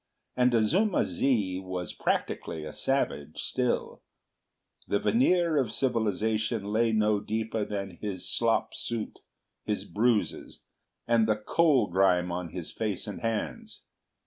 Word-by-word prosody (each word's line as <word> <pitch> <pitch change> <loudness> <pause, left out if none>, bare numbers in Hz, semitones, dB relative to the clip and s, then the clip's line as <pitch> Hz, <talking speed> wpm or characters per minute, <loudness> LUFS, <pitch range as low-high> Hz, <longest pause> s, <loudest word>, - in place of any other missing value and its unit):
And 125 0 +4
Azuma 180 - +3
zi 95 -1 0
was 90 -3 -5
practically 80 -1 -2
a 75 - -7
savage 80 - -1
still; 125 -2 -1 0.9
the 100 - +2
veneer 180 - +3
of 130 -6 +1
civilisation 110 -2 0
lay 115 +1 +3
no 105 -1 +2
deeper 110 +1 -2
than 100 -4 -5
his 100 -4 -4
slop 115 -1 +1
suit, 115 -2 -4 0.4
his - - -2
bruises, 110 +3 0 0.4
and 115 -2 +4
the 110 - +3
coal 135 +4 +3
grime 90 -1 +2
on 90 -1 -3
his 85 -1 -6
face 105 -4 -2
and 105 - -6
hands. 115 -2 -3
110 Hz, 125 wpm, -28 LUFS, 95-120 Hz, 0.9 s, And